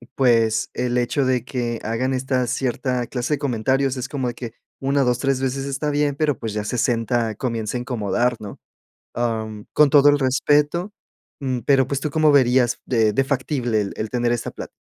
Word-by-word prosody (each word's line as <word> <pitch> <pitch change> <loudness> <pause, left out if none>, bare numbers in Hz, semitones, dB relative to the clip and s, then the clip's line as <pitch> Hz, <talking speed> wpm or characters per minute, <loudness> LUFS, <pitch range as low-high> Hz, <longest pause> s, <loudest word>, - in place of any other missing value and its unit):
pues, 115 -4 +2
el 125 0 -1
hecho 130 +3 0
de 125 -2 +1
que 120 -3 -3
hagan 120 +4 -1
esta 130 -1 0
cierta 125 0 -1
clase 125 +3 -2
de - - -10
comentarios 135 0 0
es 125 +1 -3
como 130 -3 -2
de 120 - -7
que 120 -3 -7 0.3
1, 140 +1 +2
2, 125 0 +1
3 135 0 0
veces 135 +1 -2
está 140 +2 -2
bien, 145 -1 +1
pero, 145 -2 0
pues, 110 -2 -4
ya 105 0 -2
60 115 -1 0
comienza 115 -1 -3
a 120 - -4
incomodar, 120 0 -1
¿no? 105 -2 -9 0.6
Am, 110 -3 -3
con 150 -2 +5
todo 145 0 +6
el 145 - +2
respeto, 145 +7 +1 0.5
mm, 130 -3 -2
pero, 135 -2 +4
pues, 140 -1 -1
¿tú 150 - -2
cómo 155 0 +3
verías 125 -3 +3
de 110 -4 +2
de 135 +5 +1
factible 130 -4 -1
el 100 - -5
el 110 - -3
tener 120 -1 0
esta 120 - -2
plat? - - -8
125 Hz, 195 wpm, -22 LUFS, 120-135 Hz, 0.6 s, todo